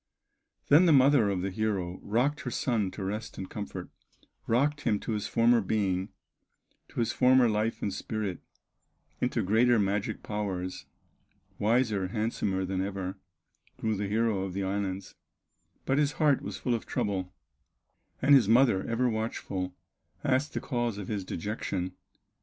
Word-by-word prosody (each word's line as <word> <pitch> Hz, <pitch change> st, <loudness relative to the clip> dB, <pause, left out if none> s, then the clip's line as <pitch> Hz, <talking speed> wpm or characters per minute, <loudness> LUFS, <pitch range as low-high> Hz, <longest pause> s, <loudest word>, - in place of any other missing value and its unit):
Then 165 Hz, +5 st, +7 dB
the -, -, +6 dB
mother 135 Hz, -5 st, +5 dB
of 95 Hz, -2 st, -1 dB
the 95 Hz, -, -2 dB
hero 95 Hz, -4 st, -2 dB
Rocked 130 Hz, +8 st, +1 dB
her 125 Hz, -, -4 dB
son 115 Hz, -5 st, 0 dB
to 95 Hz, -, -7 dB
rest 105 Hz, +3 st, -4 dB
and 95 Hz, -, -5 dB
comfort, 95 Hz, -3 st, -6 dB, 0.6 s
Rocked 140 Hz, +6 st, +2 dB
him 105 Hz, -4 st, +1 dB
to -, -, -4 dB
his 105 Hz, -1 st, -2 dB
former 120 Hz, 0 st, +4 dB
being, 95 Hz, -2 st, 0 dB, 0.8 s
To -, -, -3 dB
his 115 Hz, -, +1 dB
former 130 Hz, -1 st, +5 dB
life 110 Hz, +1 st, -1 dB
and 100 Hz, -, -1 dB
spirit, 105 Hz, -6 st, -3 dB, 0.8 s
Into -, -, 0 dB
greater 115 Hz, +5 st, +4 dB
magic 100 Hz, 0 st, -1 dB
powers; 100 Hz, -6 st, -4 dB, 0.7 s
Wiser, 110 Hz, -3 st, +2 dB
handsomer 100 Hz, -2 st, -1 dB
than 95 Hz, 0 st, -2 dB
ever 95 Hz, -1 st, -4 dB, 0.6 s
Grew 110 Hz, -1 st, -1 dB
the 100 Hz, 0 st, -2 dB
hero 110 Hz, -1 st, +1 dB
of 95 Hz, -1 st, -4 dB
the 100 Hz, +1 st, -2 dB
islands; 95 Hz, 0 st, -3 dB, 0.7 s
But 135 Hz, +2 st, +2 dB
his 145 Hz, -1 st, +2 dB
heart 145 Hz, -1 st, +3 dB
was -, -, -5 dB
full 125 Hz, -, -1 dB
of 115 Hz, -, -3 dB
trouble, 95 Hz, -3 st, -2 dB, 0.9 s
And 140 Hz, +1 st, +6 dB
his 125 Hz, -7 st, +6 dB
mother, 115 Hz, -4 st, +5 dB
ever 120 Hz, +2 st, +1 dB
watchful, 100 Hz, -5 st, -3 dB, 0.5 s
Asked 140 Hz, +1 st, +1 dB
the -, -, -1 dB
cause 120 Hz, -5 st, -2 dB
of 100 Hz, -2 st, -6 dB
his 105 Hz, -3 st, -2 dB
dejection. 95 Hz, -1 st, -3 dB
105 Hz, 150 wpm, -29 LUFS, 95-120 Hz, 0.9 s, Then